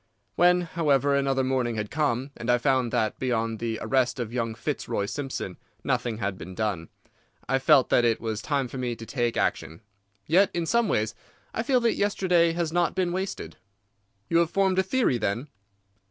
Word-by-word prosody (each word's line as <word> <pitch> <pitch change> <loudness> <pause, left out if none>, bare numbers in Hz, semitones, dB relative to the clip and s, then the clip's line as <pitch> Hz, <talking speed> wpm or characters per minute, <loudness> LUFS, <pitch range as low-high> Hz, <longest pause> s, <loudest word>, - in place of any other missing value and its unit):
When, 180 +1 +4
however, 145 -5 +1
another 135 -1 +1
morning 130 -3 0
had 105 -1 -4
come, 140 -3 0
and 120 0 -6
I 120 - +5
found 130 -1 +1
that 110 -1 0
beyond 115 -3 -1
the 115 -1 -2
arrest 130 -1 +1
of 120 -1 -4
young 115 -2 -2
Fitzroy 110 -5 -2
Simpson 130 -6 -5 0.2
nothing 115 -3 -1
had 100 -3 -3
been 90 +3 -8
done, 100 -7 -2 0.6
I 135 - +2
felt 130 0 +5
that 120 - +4
it 115 -1 +2
was 110 -1 -3
time 140 -2 -1
for 130 +2 -7
me 120 -2 -2
to 115 - -9
take 120 -2 -1
action. 80 +6 -1 0.4
Yet 185 +5 +4
in 170 -1 0
some 235 +5 +2
ways 110 - 0 0.4
I - - -1
feel 250 +1 +2
that 235 -1 +2
yesterday 180 -4 +2
has 165 -2 -2
not 175 -1 +1
been 185 -2 0
wasted." 185 - -4 0.7
"You 165 - +3
have 170 -1 +2
formed 190 0 +2
a - - +3
theory, 190 - +1
then?" 115 +7 -2
130 Hz, 185 wpm, -26 LUFS, 115-170 Hz, 0.7 s, I